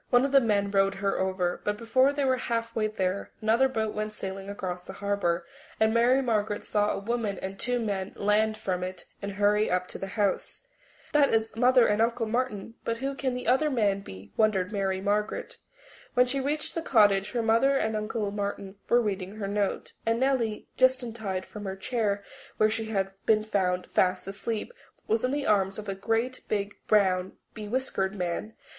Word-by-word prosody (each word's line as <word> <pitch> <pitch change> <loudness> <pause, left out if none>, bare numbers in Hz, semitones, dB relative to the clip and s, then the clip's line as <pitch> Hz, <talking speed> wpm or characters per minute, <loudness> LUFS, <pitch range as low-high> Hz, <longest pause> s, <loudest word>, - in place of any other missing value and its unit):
One 245 +1 +5
of 275 - -1
the 275 -1 +6
men 200 -4 +1
rowed 195 0 +3
her 195 0 -1
over, 185 -2 -1
but 210 0 -1
before 255 +5 +3
they 285 -1 -1
were 260 -1 +2
halfway 230 -2 -1
there 195 -2 -2
another 230 +5 +3
boat 220 -4 -1
went 215 0 -3
sailing 195 -1 -6
across 180 -3 -4
the 190 - -7
harbour, 200 -4 -1 0.3
and 220 0 +3
Mary 245 +3 +4
Margaret 215 -3 0
saw 210 0 +1
a - - -1
woman 215 -1 -2
and 190 +1 -6
two 245 0 0
men 200 -4 -2
land 215 +1 +2
from 180 -3 -2
it 185 0 -5 0.2
and 200 0 -4
hurry 205 +1 +2
up 180 0 +1
to - - -5
the 195 - -4
house. 205 - -1 0.5
That 295 -2 +4
is 220 0 -1
Mother 250 +1 +5
and 210 +1 +2
Uncle 230 0 +1
Martin, 230 -2 -2
but 230 - -1
who 270 +3 -2
can 265 -2 -2
the 250 - -5
other 265 +5 +3
man 210 -7 +1
be? 100 - -11
wondered 205 -4 +2
Mary 195 -2 -1
Margaret. 210 - -1 0.6
When 250 0 +6
she 265 +2 -1
reached 290 +3 -2
the 330 - -2
cottage 210 -7 +3
her 235 -2 0
mother 230 +5 +4
and 220 -3 0
Uncle 215 -1 -2
Martin 200 -1 -4
were 240 +1 +5
reading 195 -2 -3
her 210 -2 -4
note, 200 0 -1
and 230 +1 +1
Nellie, 250 -5 0
just 260 0 +4
untied 215 -6 -4
from 210 -1 -9
the 190 0 -3
chair 205 -1 -1 0.3
where 215 0 +4
she 225 0 -2
had 195 -3 -1 0.2
been 215 -1 +4
found 185 -4 0
fast 185 0 +1
asleep, 215 - -3 0.3
was 225 +2 +1
in 255 - +2
the 285 +1 -1
arms 195 -2 +2
of 215 - -7
a 195 - -1
great, 225 +6 -1
big, 205 -1 -1
brown, 190 -3 +3 0.2
bewhiskered 215 -3 -2
man. 180 +4 -3
215 Hz, 195 wpm, -28 LUFS, 195-235 Hz, 0.6 s, the